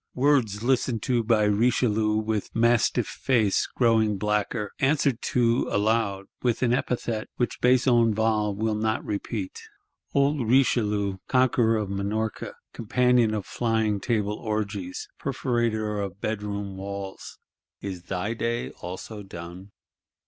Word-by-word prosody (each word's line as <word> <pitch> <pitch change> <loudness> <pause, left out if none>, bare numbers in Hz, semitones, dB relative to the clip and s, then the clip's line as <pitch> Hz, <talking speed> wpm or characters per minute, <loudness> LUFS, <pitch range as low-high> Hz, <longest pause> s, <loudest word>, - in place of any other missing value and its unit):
Words 125 -6 +2
listened 125 -3 +1
to 120 -2 +1
by 110 -1 +3
Richelieu 105 0 +2
with 110 -1 -2
mastiff 115 0 +3
face, 110 -7 +1
growing 110 -4 +3
blacker; 105 +1 -1
answered 135 -3 +2
to, 120 -1 +1
aloud, 100 -2 +1 0.2
"with 120 0 0
an 120 -1 +3
epithet,"—which 120 -1 -2
Besenval 115 -4 +3
will 110 +2 0
not 110 +1 -1
repeat. 100 -1 -4 0.5
Old 140 -4 +2
Richelieu, 105 -6 +2
conqueror 120 -3 +3
of 105 -2 -3
Minorca, 105 +2 -3 0.2
companion 120 -1 +2
of 105 -3 -3
Flying 110 -3 0
Table 105 -1 -1
orgies, 105 -4 -3
perforator 115 -6 -1
of 95 -1 -6
bedroom 100 -2 -3
walls, 100 0 -7 0.4
is 95 -3 -6
thy 95 +5 -2
day 115 +1 -2
also 95 +4 -8
done? 90 +1 -9
110 Hz, 115 wpm, -26 LUFS, 100-120 Hz, 0.5 s, by